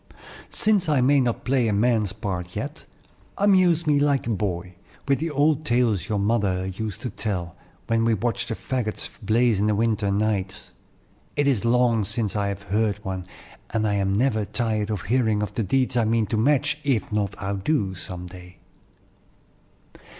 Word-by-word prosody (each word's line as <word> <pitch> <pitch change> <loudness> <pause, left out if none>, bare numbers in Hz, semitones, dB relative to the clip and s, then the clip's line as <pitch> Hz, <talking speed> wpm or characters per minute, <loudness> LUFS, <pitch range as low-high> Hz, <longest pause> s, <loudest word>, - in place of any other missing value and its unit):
"Since 205 -6 +2
I 145 -3 +3
may 140 +3 +4
not 120 -2 -1
play 130 -2 +2
a 105 - +1
man's 110 -2 +2
part 90 -3 -5
yet, - - -5 0.5
amuse 185 -4 +4
me 150 -2 +3
like 140 -2 +2
a 115 - -1
boy, 90 -3 -2 0.3
with 140 -1 +2
the 165 +2 -1
old 150 +1 +2
tales 120 - +1
your 105 - 0
mother 100 -3 +1
used 105 +2 -5
to 125 - -4
tell, 90 -6 -3 0.3
when 115 0 +1
we 115 -1 +3
watched 115 +2 -2
the 115 - -2
fagots 120 -4 -3
blaze 115 -1 +2
in 105 - +2
the 105 - +2
winter 110 -2 +1
nights. 100 -2 -1 0.6
It 145 - +2
is 125 -6 +1
long 120 -2 +3
since 105 0 -2
I 100 -1 0
have 100 0 -4
heard 105 +1 0
one, 95 -1 -4 0.5
and 110 -1 +1
I 105 - +1
am 100 -1 +1
never 110 +1 +1
tired 110 0 -1 0.2
hearing 110 -2 +1
of 105 -1 -4
the 115 - -1
deeds 130 +5 +1
I 115 -2 +3
mean 115 0 +2
to - - +4
match, 140 +5 +2
if 130 -9 0
not 100 -2 -1
outdo, 100 +2 -1
some 90 -1 -7
day. 90 0 -12
110 Hz, 175 wpm, -24 LUFS, 100-125 Hz, 0.6 s, may